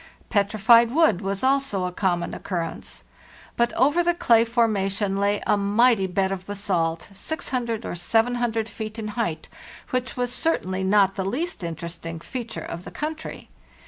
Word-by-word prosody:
Petrified 220 Hz, +3 st, +4 dB
wood 270 Hz, -, +3 dB
was 195 Hz, +2 st, -3 dB
also 265 Hz, -8 st, +1 dB
of 180 Hz, 0 st, -5 dB
common 175 Hz, -3 st, 0 dB
occurrence. 170 Hz, -3 st, -5 dB, 0.5 s
But 235 Hz, 0 st, +2 dB
over 290 Hz, +8 st, +3 dB
the 345 Hz, 0 st, +2 dB
clay 230 Hz, -8 st, +4 dB
forma 225 Hz, -4 st, +1 dB
tion 195 Hz, 0 st, -1 dB
lay 200 Hz, +1 st, +1 dB
a -, -, +3 dB
mighty 205 Hz, +1 st, +3 dB
bed 190 Hz, +1 st, 0 dB
of 190 Hz, -1 st, -5 dB
basalt 185 Hz, -5 st, -1 dB
600 235 Hz, -2 st, -3 dB
or -, -, -4 dB
7oo 225 Hz, +4 st, +1 dB
feet 215 Hz, 0 st, -7 dB
in 215 Hz, -1 st, -4 dB
height, 210 Hz, -7 st, -3 dB, 0.4 s
which 255 Hz, -1 st, -2 dB
was 245 Hz, 0 st, 0 dB
certainly 190 Hz, -, 0 dB
not 195 Hz, 0 st, +4 dB
the 195 Hz, -, -3 dB
least 260 Hz, -, -3 dB
interesting 165 Hz, 0 st, -5 dB
feat 235 Hz, +6 st, -6 dB
ure -, -, -5 dB
of 170 Hz, -, -6 dB
the -, -, -8 dB
country. 315 Hz, +1 st, -6 dB
210 Hz, 160 wpm, -24 LUFS, 190-240 Hz, 0.5 s, Petrified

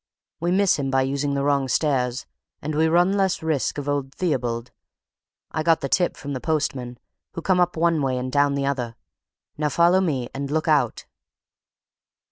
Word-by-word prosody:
We 170 Hz, -, -1 dB
miss 190 Hz, -2 st, +3 dB
him 135 Hz, -1 st, -1 dB
by 135 Hz, 0 st, +2 dB
using 140 Hz, +1 st, -1 dB
the 140 Hz, -, 0 dB
wrong 140 Hz, -2 st, +1 dB
stairs, 130 Hz, -3 st, 0 dB, 0.3 s
and 155 Hz, -, -4 dB
we 160 Hz, +2 st, +3 dB
run 175 Hz, +4 st, +3 dB
less 195 Hz, -4 st, 0 dB
risk 155 Hz, -4 st, -1 dB
of 145 Hz, -1 st, -4 dB
old 140 Hz, -2 st, -2 dB
Theobald. 125 Hz, -8 st, -2 dB, 0.8 s
I 155 Hz, -, -1 dB
got 165 Hz, 0 st, +3 dB
the 140 Hz, -, -3 dB
tip 175 Hz, +4 st, +1 dB
from 145 Hz, 0 st, -6 dB
the 130 Hz, -, -4 dB
postmen, 135 Hz, -6 st, -2 dB, 0.4 s
who 170 Hz, -, -5 dB
come 185 Hz, +2 st, +2 dB
up 175 Hz, -1 st, +1 dB
one 165 Hz, -1 st, +2 dB
way 130 Hz, -2 st, 0 dB
and 125 Hz, 0 st, -3 dB
down 145 Hz, 0 st, +2 dB
the 140 Hz, 0 st, -1 dB
other. 125 Hz, -4 st, -2 dB, 0.6 s
Now, 150 Hz, -1 st, +1 dB
follow 175 Hz, +5 st, +4 dB
me, 135 Hz, -9 st, -1 dB
and 140 Hz, 0 st, -4 dB
look 155 Hz, +2 st, -1 dB
out!" 145 Hz, -7 st, +1 dB
145 Hz, 185 wpm, -23 LUFS, 135-165 Hz, 0.8 s, follow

